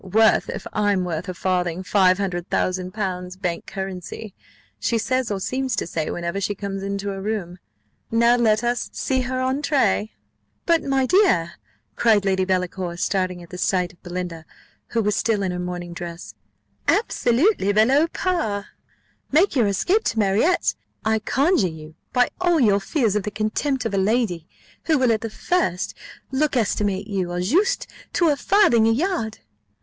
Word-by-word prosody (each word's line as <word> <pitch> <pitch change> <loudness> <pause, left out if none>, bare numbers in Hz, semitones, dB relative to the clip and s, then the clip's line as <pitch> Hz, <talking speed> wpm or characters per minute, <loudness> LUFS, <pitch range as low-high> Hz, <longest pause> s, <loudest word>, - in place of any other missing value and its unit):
'Worth, 215 +3 +3
if - - -5
I'm 205 -3 +1
worth 175 0 -3
a - - -3
farthing, 180 -1 -1
five 185 0 +4
hundred 180 -3 -3
thousand 185 0 -1
pounds 185 -3 -4
bank 180 -2 -3
currency!' 190 +2 -6 0.5
she 235 - 0
says 255 +1 0
or 200 -2 -2
seems 260 +4 -1
to - - -1
say, 160 -2 -3
whenever 170 +3 -3
she 205 +1 -1
comes 195 -1 -5
into 200 0 -3
a 195 - -6
room. 190 -4 -3 0.5
Now 235 +1 +4
let 225 -2 +2
us 240 0 -1
see 260 -1 0
her 255 +1 -3
entrée 255 - +1 0.3
" 105 -1 -47
"But, 335 -1 +3
my 270 -1 +1
dear," 295 - +3 0.4
cried 215 -4 +3
Lady 190 -1 +2
Delacour, 180 -1 -2
starting 185 -1 -1
at 170 - -15
the 180 - -7
sight 180 -2 0
of 170 - -27
Belinda, 175 -2 -5 0.4
who 230 -1 0
was 210 -1 +1
still 215 -3 +1
in 185 - -1
her 180 - -4
morning 175 -1 -5
dress, 170 -10 -7 0.5
"absolutely 280 - +2
below 260 +10 +4
par! 315 - -2 0.6
Make 330 +4 +3
your 235 -5 +3
escape 365 - +1
to - - -1
Marriott, 210 - +2 0.3
I 220 0 +2
conjure 275 - +2
you, 160 -1 -9 0.2
by 250 -1 +3
all 350 -2 +3
your 205 -6 +4
fears 225 -2 0
of 210 - +2
the 210 - -3
contempt 220 +6 -1
of 225 - -2
a 195 - +2
lady, 190 -5 0 0.4
who 315 -2 +3
will 255 -3 +3
at 220 -1 +1
the 225 - -4
first 215 - -1 0.4
look 280 0 +1
estimate 200 -3 0
you, 190 -4 -2
au 175 - -2
juste, 360 - +1 0.3
to 340 -2 +3
a 295 - +3
farthing 265 - +4
a - - +4
yard." 275 - -1
205 Hz, 175 wpm, -23 LUFS, 180-250 Hz, 0.6 s, five